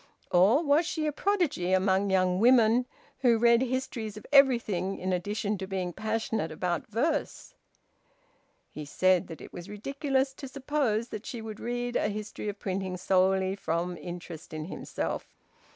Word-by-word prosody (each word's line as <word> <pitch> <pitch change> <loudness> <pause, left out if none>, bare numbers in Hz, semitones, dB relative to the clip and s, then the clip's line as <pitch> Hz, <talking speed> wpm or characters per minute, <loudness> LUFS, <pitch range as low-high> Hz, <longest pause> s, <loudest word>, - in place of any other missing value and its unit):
Or 200 - +5
was 305 +2 +3
she 310 -1 -2
a 300 - +1
prodigy 300 - 0
among 190 +1 +2
young 185 -1 +2
women, 240 +1 +5 0.3
who 245 -3 +4
read 235 +1 +5
histories 245 -4 -3
of 210 - -10
everything 230 -9 +4
in 185 0 -2
addition 205 +2 -2
to 190 - -5
being 185 -2 -3
passionate 220 -4 -2
about 175 +1 -2
verse? 285 +8 -2 1.2
He 150 - -7
said 185 +5 +2
that 165 - -9
it - - -11
was 175 +2 -8
ridiculous 270 +5 -1
to 270 +1 -8
suppose 260 -4 -1
that 215 - -7
she 245 - -5
would 220 -1 -7
read 245 0 -3
a - - +1
history 210 0 -5
of 205 - -5
printing 190 -2 -3
solely 190 +1 +2
from 175 -1 -2
interest 175 -2 -8
in 155 0 -4
himself. 180 - -5
210 Hz, 155 wpm, -29 LUFS, 185-250 Hz, 1.2 s, Or